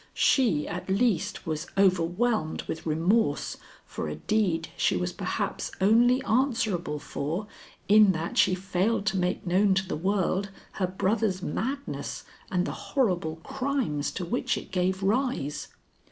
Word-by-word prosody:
She, 215 - +3
at 180 +3 -5
least, 200 0 +1
was 155 -1 -3
overwhelmed 185 +1 +2
with 160 +1 -6
remorse 175 +9 +1 0.3
for - - -5
a - - -4
deed 185 -7 0
she - - +2
was 90 0 -2
perhaps - - -3
only 240 +6 +4
answerable 220 - 0
for 155 +7 -4 0.4
in 210 -1 +7
that 165 0 -4
she 185 - +4
failed 195 +3 0
to 195 -2 +1
make 180 +1 -1
known 190 +2 +3
to 190 0 0
the - - -2
world 190 +3 0 0.2
her 185 - -1
brother's 190 +1 0
madness 275 +4 -3 0.3
and 180 -1 +1
the - - -2 0.3
horrible 175 -11 +1
crimes 265 - -1
to 180 - -3
which 170 - -1
it - - -8
gave 185 +1 0
rise. 195 - 0
190 Hz, 140 wpm, -27 LUFS, 170-220 Hz, 0.4 s, in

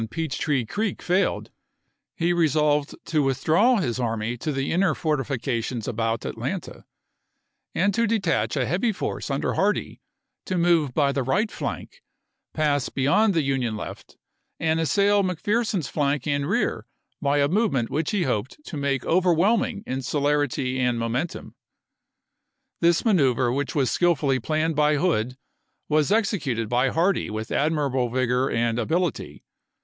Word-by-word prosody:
Peach 160 -5 -3
Tree 140 -6 0
Creek 205 - -2
failed, 185 +3 0 0.6
he 175 +1 +1
resolved 150 -3 +1
to 155 -2 +1
withdraw 155 - +3
his 130 - -1
army 115 -1 -2
to 150 +6 -3
the 135 -1 -2
inner 180 -2 +2
fortifications 130 -6 -2
about 115 -1 -2
Atlanta, - - -5 0.9
and 195 +4 +2
to 230 +2 +1
detach 195 -8 0
a 130 - +1
heavy 190 - +1
force 195 - -4
under 140 0 -1
Hardee 205 +2 -1 0.4
to 185 - -2
move 170 -6 +2
by 140 -2 +3
the 140 - -1
right 200 - 0
flank, - - -6 0.5
pass 145 -3 0
beyond 170 +10 +2
the 160 - +2
Union 130 -5 -1
left, - - -9 0.4
and 160 0 +1
assail 200 +5 +3
McPherson's 195 - -1
flank 145 -2 -1
and 145 -1 -1
rear - - -1 0.3
by 140 +1 +1
a 140 0 +3
movement 160 - 0
which 155 +1 -1
he 200 -4 0
hoped 125 -4 -2
to 155 - -6
make 140 -2 -1
overwhelming 185 +5 +2
in 130 +1 -3
celerity 145 -2 0
and 125 -2 +1
momentum. 120 +8 -3 1.3
This 170 +4 +3
manoeuvre 130 - +3
which 140 +1 -2
was 135 -4 +1
skill 175 -1 +3
fully 135 -2 0
planned 155 +2 -1
by 150 0 +3
Hood 130 -7 0 0.5
was 155 +3 +2
executed 150 - 0
by 125 +2 +2
Hardee 175 +7 +1
with 110 +1 -5
admirable 140 -5 0
vigor 125 +1 +1
and 115 0 0
ability. 170 +1 -2
145 Hz, 145 wpm, -24 LUFS, 130-175 Hz, 1.3 s, withdraw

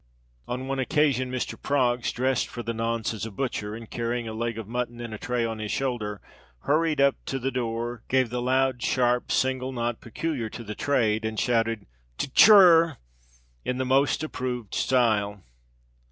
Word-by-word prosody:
On 125 +2 -4
one 135 0 -2
occasion, 130 -2 +1
Mr. 130 -1 -4
Proggs, 125 -4 +1
dressed 130 0 0
for 120 - -7
the 115 +1 -3
nonce 115 0 -1
as 110 - -6
a 115 - -3
butcher, 105 -2 -3
and 115 0 -9
carrying 120 +1 -3
a 110 - -5
leg 115 0 -3
of 110 -3 -6
mutton 120 0 -3
in 120 -2 -6
a 110 - -6
tray 120 -1 -1
on 115 -1 -4
his 105 -1 -4
shoulder, 115 -6 -2 0.4
hurried 155 0 +1
up 140 0 +4
to 135 - -1
the 135 +1 -2
door, 120 -1 -3
gave 130 -3 +2
the 125 0 -2
loud, 130 0 +1
sharp, 125 -1 +1
single 130 0 0
knock 120 -2 -2
peculiar 120 -1 -3
to 115 - -8
the 105 -1 -6
trade, 110 -5 +1
and 110 -1 -2
shouted 115 -3 0 0.3
"T 135 - -3
cher!" 175 -6 +8 0.7
in 125 - -2
the 130 - -1
most 135 +3 +2
approved 125 -7 -4
style. 105 -6 +1
120 Hz, 180 wpm, -26 LUFS, 115-130 Hz, 0.7 s, cher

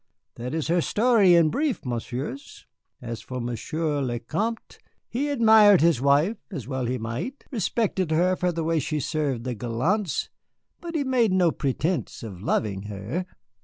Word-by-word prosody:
That 125 +5 -5
is 160 - -2
her 175 +1 +3
story 210 -3 +4
in 165 -2 +4
brief, 290 - -1
Messieurs. 125 +2 -5 0.4
As 115 -1 -5
for 125 -1 -6
Monsieur 145 +6 -2
le 125 -3 -1
Vicomte, 215 - -3 0.3
he 280 +5 -2
admired 220 - +6
his 165 -6 +3
wife, 145 +10 +3
as 145 - -6
well 130 -3 -2
he 125 +1 -1
might, 125 - -5
respected 205 - 0
her 175 +4 +2
for 180 -1 0
the 165 -1 -3
way 165 0 +1
she 155 +2 -2
served 140 -5 -2
the 125 0 -3
gallants, 130 - -1 0.5
but 340 -1 -7
he 300 - +1
made 250 -5 +2
no 180 -3 +3
pretence 155 +4 -2
of 95 -5 -8
loving 100 -2 -1
her. 105 - -4
160 Hz, 165 wpm, -25 LUFS, 125-200 Hz, 0.5 s, admired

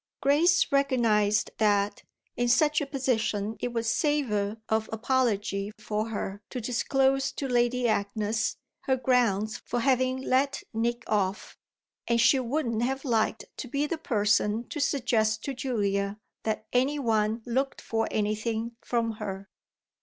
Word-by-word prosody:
Grace 320 +6 +3
recognised 225 -7 +2
that 205 -1 +2 0.3
in 245 - 0
such 300 +5 +3
a 290 - -2
position 225 -6 -1
it - - -1
would 235 -1 -2
savour 225 -7 0
of 220 0 0
apology 215 -4 0
for 215 +1 -3
her 205 -2 -4
to 255 - -4
disclose 270 +3 +1
to 275 - -4
Lady 245 0 +2
Agnes 215 +1 0 0.3
her 265 -1 +2
grounds 235 -5 +1
for 245 - -2
having 255 0 +2
let 270 +2 +1
Nick 235 +2 -1
off; 200 -2 -1 0.5
and 235 0 +2
she 235 +3 +5
wouldn't 240 -3 -1
have 265 +3 -1
liked 225 -3 0
to - - -5
be 280 +4 0
the 320 +2 -3
person 210 -1 +1
to 305 - -5
suggest 230 -6 +1
to 275 - -3
Julia 205 -6 -1 0.3
that 220 0 -1
any 265 +4 +2
one 220 -3 0
looked 265 +3 -1
for 225 0 -1
anything 220 +2 -2
from 230 -2 0
her. 195 0 -6
235 Hz, 140 wpm, -28 LUFS, 215-260 Hz, 0.5 s, she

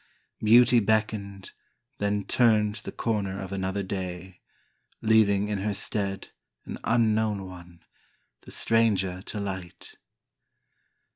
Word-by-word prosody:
Beauty 120 +2 +6
beckoned, 105 -2 -1 0.5
Then 105 0 0
turned 110 -2 +2
the - - -7
corner 100 -4 -2
of 95 -1 -7
another 95 +1 -2
day 95 -1 -6 0.6
Leaving 105 -2 +3
in 105 -1 -2
her 100 +1 -2
stead 100 -1 -3 0.4
An - - -7
unknown 110 -3 +1
one, 90 -2 -12 0.6
The - - -14
stranger 100 -5 +1
to 105 - -6
light. 95 -3 -7
100 Hz, 110 wpm, -27 LUFS, 95-110 Hz, 0.6 s, Beauty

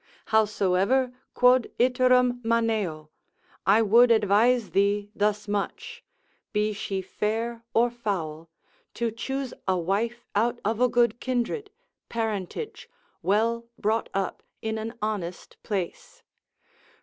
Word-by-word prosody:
Howsoever, 215 +4 +2 0.2
quod 250 -1 +5
iterum 250 0 +3
maneo, 220 -9 0 0.6
I 210 +4 +6
would 235 +4 +6
advise 220 +2 +3
thee 200 +1 +1
thus 210 0 0
much, 205 -1 -4 0.5
be 210 0 +1
she 195 -2 -3
fair 225 +4 -2
or 235 +1 +4
foul, 165 -9 -4 0.5
to 235 -1 -1
choose 265 +4 -4
a 190 -1 +2
wife 215 +7 -1
out 235 +4 +1
of 220 +3 0
a 250 - +5
good 240 -1 +2
kindred, 260 - -2 0.4
parentage, 225 - -4 0.3
well 230 +4 +1
brought 220 +2 0
up, 195 -1 -2 0.2
in 220 0 -3
an 225 +2 -5
honest 190 -5 -4
place. 195 -5 -5
220 Hz, 115 wpm, -26 LUFS, 200-240 Hz, 0.6 s, I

